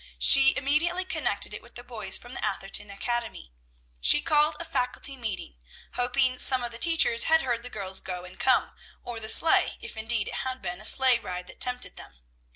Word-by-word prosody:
She 275 0 +6
immediately 335 +6 -1
connected 375 - -3
it - - -8
with - - -18
the 245 - -9
boys 220 -6 -1
from 245 +1 -13
the - - -5
Atherton 195 +1 -4
Academy. 215 - -5 0.5
She - - +6
called 300 0 +1
a 335 - -6
Faculty 270 -2 -3
meeting, 200 - -7 0.3
hoping 255 +1 0
some 260 -2 +4
of 240 - -4
the 230 - -7
teachers 325 -8 +2
had 320 0 +2
heard 240 -3 -2
the 250 - -9
girls 190 -4 -3
go 180 -1 -7
and 180 +1 -15
come, 260 - +1 0.3
or 240 -2 -7
the 220 0 -5
sleigh, 325 +7 +4
if 470 - -9
indeed 220 -1 -1
it - - -6
had 260 0 -5
been 180 -2 -6
a - - -3
sleigh 260 -1 +6
ride 180 -4 -7
that - - -14
tempted 250 0 -1
them. 60 - -13
245 Hz, 200 wpm, -26 LUFS, 205-270 Hz, 0.5 s, She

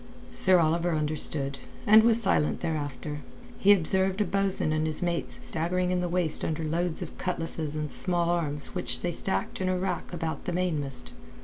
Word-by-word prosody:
Sir 185 -1 +4
Oliver 165 +1 +1
understood, 150 -2 -2 0.3
and 215 +1 +8
was 230 0 +4
silent 190 -8 +1
thereafter. 150 -1 -3 0.4
He 200 - +6
observed 190 +1 +3
a 210 - +2
bo'sun 195 -3 +1
and 155 0 0
his 155 +2 -2
mates 170 -1 -2
staggering 180 +3 -1
in 180 -1 +1
the 175 - -2
waist 170 -3 +1
under 160 0 -2
loads 165 +1 -1
of - - -9
cutlasses 165 -4 -2
and 150 -1 -3
small 175 -2 +2
arms 150 -4 -2
which - - -2
they 175 - -1
stacked 190 +2 0
in 185 - 0
a 185 - +1
rack 180 -1 -3
about 165 -2 -4
the 180 - -2
mainmast. 145 - -2
170 Hz, 180 wpm, -28 LUFS, 155-185 Hz, 0.4 s, and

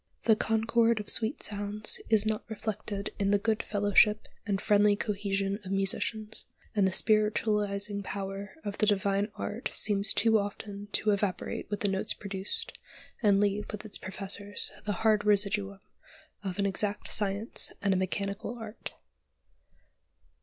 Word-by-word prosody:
The 220 - +5
"concord 225 +1 +2
of 210 - -5
sweet 230 +6 +2
sounds" 205 +1 0
is 220 -1 +4
not 215 -1 -1
reflected 210 -2 -4
in 200 -1 +1
the 205 - +4
good 220 +1 0
fellowship 205 +1 +3 0.2
and 200 -2 0
friendly 205 0 +4
cohesion 200 -1 -2
of 190 - -7
musicians; 210 +3 -2 0.3
and 200 -2 +4
the - - 0
spiritualising 210 -1 +1
power 195 0 -5
of 205 0 -4
the 215 - +3
divine 200 0 +1
art 220 +4 -4
seems 205 -1 +1
too 225 -1 +4
often 205 0 -6
to 215 - +2
evaporate 200 -2 -2
with 205 -1 -3
the 205 - +2
notes 195 0 -1
produced, 200 - -2 0.5
and 200 -3 +4
leave 205 0 0
with 210 +1 -7
its 205 - -3
professors 200 +2 -1
the 205 - 0
hard 215 -1 +4
residuum 200 -1 +1 0.6
of 190 -2 -4
an 200 - +1
exact 200 +1 -1
science 205 +2 0
and 200 -1 +1
a - - +1
mechanical 200 +4 -3
art. 225 -1 -8
205 Hz, 145 wpm, -29 LUFS, 200-215 Hz, 0.6 s, The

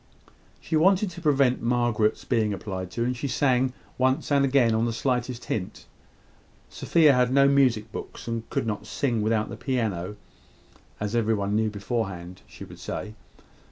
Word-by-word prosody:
She - - -3
wanted 190 +4 +3
to 175 - -10
prevent 140 -5 +2
Margaret's 120 -3 +1
being 110 -4 +1
applied 95 -2 -5
to, 115 +5 -2
and 125 +1 -1
she 135 +3 -3
sang, 130 -1 +2 0.3
once 130 +3 +1
and 140 -1 +4
again, 130 -4 +3
on 110 +1 +1
the 115 - -1
slightest 125 0 -2
hint. 95 -4 -4 0.8
Sophia 155 -4 +3
had 125 -1 +2
no 140 +1 +5
music 125 -6 +2
books, - - -8
and 115 -1 -4
could - - -1
not 105 -1 -4
sing 120 -3 -1
without 110 0 0
the - - -7
piano, 105 -7 -2 0.8
as 105 +2 -2
every 115 -1 +2
one 100 0 -1
knew 110 0 +2
beforehand 100 -4 -4
she - - -10
would - - -13
say. 110 - -5
120 Hz, 165 wpm, -26 LUFS, 105-130 Hz, 0.8 s, no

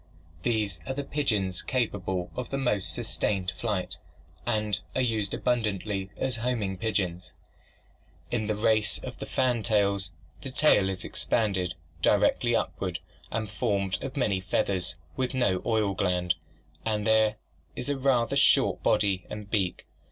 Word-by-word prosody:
These 105 -7 0
are 130 - -2
the 140 - -2
pigeons 105 - 0
capable 95 -7 -1
of 125 -1 -4
the 135 - -2
most 105 -8 +1
sustained 95 -3 -1
flight 105 -2 -2 0.5
and 105 -1 +1 0.2
are 130 - +2
used 110 -5 +1
abundantly 105 -5 -1
as 130 -3 -1
homing 115 -5 -1
birds. 90 -4 -2 1.0
In 110 -3 0
the 105 - 0
race 105 0 +4
of - - -6
fantails, 105 -6 +1 0.3
the 135 - -4
tail 130 -8 +4
is 95 -1 -4
expanded, 95 -7 0 0.3
directed - - +3
upward 90 -3 -1 0.3
and 110 -1 -2
formed 100 -1 -1
of 135 +1 -5
many 100 -8 +2
feathers, 90 -3 0 0.2
with 130 0 -1
no 100 -8 +2
oil 110 -3 +2
gland, 90 -2 +1 0.5
and 105 -2 -1
there 110 -1 +4 0.4
is 125 - -4
a 145 - +1
rather 130 -3 +2
short - - +4
body 95 -3 +2
and 105 -1 -7
beak. 95 -5 0
105 Hz, 135 wpm, -28 LUFS, 95-120 Hz, 1.0 s, race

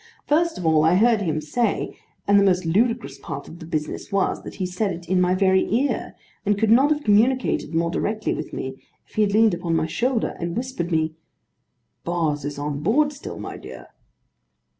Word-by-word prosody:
First 330 +3 +2
of 180 - -5
all 160 -1 +4
I 160 +3 +4
heard 225 +2 +4
him 160 -5 -1
say: 230 +11 -1 0.3
and 200 0 +6
the - - +4
most 185 -2 +2
ludicrous 230 +8 0
part - - -7
of 170 - -11
the 160 - -9
business 155 +4 -4
was, 195 -1 0
that - - -9
he 190 - -2
said 185 +3 -1
it 170 -1 -7
in 185 +1 +2
my 180 0 +3
very 190 0 +3
ear, 260 +6 0 0.3
and 205 -1 +1
could 220 +1 +2
not 265 +5 +6
have 300 -1 0
communicated 220 - +2
more 170 0 +1
directly 215 +4 -1
with 155 - -5
me, 130 0 -6 0.3
if - - -26
he 215 - +1
had 205 -1 +2
leaned 220 -1 +5
upon 170 -1 -1
my 160 -1 +1
shoulder, 235 +8 -1
and 170 +2 -3
whispered 240 -9 -3
me: 160 -1 +1 0.9
'Boz 160 -5 -1
is 145 -1 -4
on 145 0 -3
board 290 - +2
still, 280 - -8
my - - -7
dear. - - -11
190 Hz, 205 wpm, -23 LUFS, 165-225 Hz, 0.9 s, and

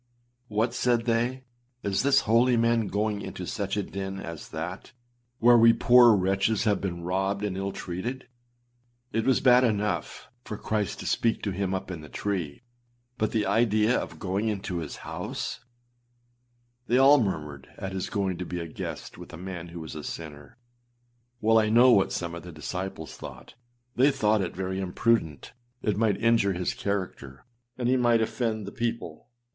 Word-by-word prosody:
âWhat!â 110 +3 0
said 120 -2 +1
they, 120 +3 0 0.4
âIs 100 -1 0
this 140 0 +4
holy 120 +3 +3
man 115 -1 +2
going 105 +1 -1
into - - -6
such - - -3
a - - 0
den 95 0 -5
as 85 -4 -8
that, 90 +9 -6 0.4
where 120 0 +6
we 115 0 +7
poor 120 -2 +6
wretches 95 +3 +1
have 105 -2 +1
been 85 -3 -4
robbed 95 +3 -1
and 100 -3 -2
ill 95 +1 -2
treated. 110 +10 -5 0.9
It 115 - 0
was 130 - +3
bad 125 -1 +6
enough 105 -3 -1 0.2
for 105 - -6
Christ 105 -4 -2
to - - -8
speak 115 -1 0
to 100 - -1
him 95 0 -1
up 95 0 -5
in 85 -4 -6
the 75 - -11
tree, 90 - -3 0.6
but 110 - +1
the 110 -3 +1
idea 110 0 +3
of - - -3
going 100 +3 -2
into 95 -4 -2
his 80 -3 -6
house!â - - -5 1.3
They 120 - +3
all 135 +1 +7
murmured 75 -8 -4
at 95 - -5
his 95 -1 -3
going 95 -3 -1
to 90 - -3
be 90 - -5
âa 85 -1 -5
guest - - -6
with - - -10
a 85 - -9
man 90 -1 -6
who 85 0 -8
was 80 - -7
a 75 - -7
sinner.â 75 -3 -8 0.9
Well, 115 +1 +5
I 110 -1 +2
know 120 +3 +6
what 100 -5 +4
some 85 -1 -3
of 85 - -7
his 85 -3 -10
disciples 85 0 -5
thought: 65 0 -10 0.4
they 130 +4 +5
thought 110 -6 +2
it 90 - -4
very 95 +1 -3
imprudent; 95 - 0 0.3
it 105 - +1
might 105 -2 +2
injure 115 -3 +3
his 90 0 -2
character, 90 -9 -4 0.3
and 125 -2 -1
he 130 +1 +3
might 120 -2 +3
offend 110 -2 -2
the 100 - -7
people. 115 -10 -4
100 Hz, 180 wpm, -27 LUFS, 90-115 Hz, 1.3 s, we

